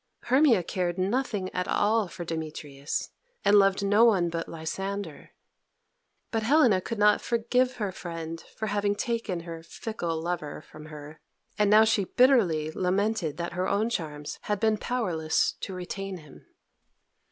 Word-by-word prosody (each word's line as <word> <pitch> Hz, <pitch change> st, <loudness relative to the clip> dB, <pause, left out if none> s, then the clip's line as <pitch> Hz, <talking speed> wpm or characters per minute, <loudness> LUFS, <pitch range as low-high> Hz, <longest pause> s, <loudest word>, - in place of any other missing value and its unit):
Hermia 255 Hz, -, +4 dB
cared 175 Hz, 0 st, -2 dB
nothing 200 Hz, -1 st, -1 dB
at 180 Hz, 0 st, -2 dB
all 215 Hz, 0 st, +2 dB
for 175 Hz, 0 st, -7 dB
Demetrius, 150 Hz, -3 st, -4 dB, 0.3 s
and 205 Hz, -, +6 dB
loved 195 Hz, 0 st, +4 dB
no 205 Hz, +3 st, +5 dB
one 190 Hz, -7 st, +4 dB
but 165 Hz, 0 st, -4 dB
Lysander. 180 Hz, +1 st, -5 dB, 1.0 s
But 225 Hz, -, 0 dB
Helena 235 Hz, -5 st, +4 dB
could 230 Hz, -, -5 dB
not 210 Hz, 0 st, +4 dB
forgive 250 Hz, +2 st, +1 dB
her 205 Hz, -4 st, -2 dB
friend 165 Hz, -2 st, -6 dB
for 220 Hz, -, -3 dB
having 205 Hz, 0 st, 0 dB
taken 220 Hz, -6 st, -2 dB
her 165 Hz, -1 st, -8 dB
fickle 170 Hz, -2 st, -4 dB
lover 165 Hz, -3 st, -4 dB
from 155 Hz, 0 st, -13 dB
her, 150 Hz, 0 st, -10 dB, 0.4 s
and 210 Hz, -1 st, +4 dB
now 215 Hz, +1 st, +7 dB
she 220 Hz, -3 st, +2 dB
bitterly 185 Hz, -, +3 dB
lamented 190 Hz, -1 st, 0 dB
that 170 Hz, 0 st, -4 dB
her 180 Hz, +1 st, -1 dB
own 215 Hz, +4 st, +1 dB
charms 150 Hz, -7 st, -4 dB
had 210 Hz, -1 st, -2 dB
been 220 Hz, 0 st, +2 dB
powerless 180 Hz, -11 st, 0 dB
to 195 Hz, -, -5 dB
retain 190 Hz, +1 st, -5 dB
him. 150 Hz, -4 st, -15 dB
190 Hz, 150 wpm, -27 LUFS, 165-220 Hz, 1.0 s, now